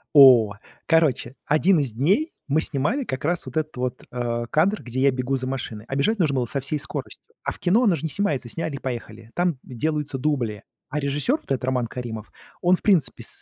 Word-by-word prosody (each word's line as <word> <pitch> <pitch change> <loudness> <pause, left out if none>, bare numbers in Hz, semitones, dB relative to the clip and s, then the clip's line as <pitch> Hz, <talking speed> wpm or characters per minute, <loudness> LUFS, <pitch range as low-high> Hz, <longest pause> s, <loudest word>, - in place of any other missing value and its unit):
О, 125 -7 +8 0.3
короче, 155 -6 +2
один 165 +5 +4
из 135 -5 -1
дней 190 - +1 0.2
мы 150 +3 +3
снимали 205 - 0
как 130 - -4
раз 175 +3 0
вот 130 - -9
этот 155 -2 -3
вот, 125 0 -3
э, 120 -1 -2
кадр, 190 - +2
где 125 +1 -4
я 140 +1 +5
бегу 130 +1 -1
за 130 -1 -3
машиной, 120 -5 -4
а 135 - -4
бежать 215 +11 +2
нужно 155 -7 +2
было 125 -2 +1
со 140 +4 -2
всей 145 +3 -2
скоростью. - - -6 0.2
А - - -1
в - - -13
кино, 200 +7 +3
оно 200 -6 +4
же 160 - -3
не - - 0
снимается 145 -6 -1
"сняли 160 +2 -3
и - - -6
поехали", 115 -3 -6
там 175 -5 +1
делаются 150 +3 -2
дубли, 125 -7 -1 0.3
а 150 - -2
режиссёр, 145 - +1
вот - - -21
этот 130 - -2
Роман 125 -2 0
Каримов, 115 -3 -6 0.3
он 180 +1 +5
в - - -16
принципе 185 -9 +2
с - - -2
140 Hz, 220 wpm, -24 LUFS, 125-160 Hz, 0.3 s, О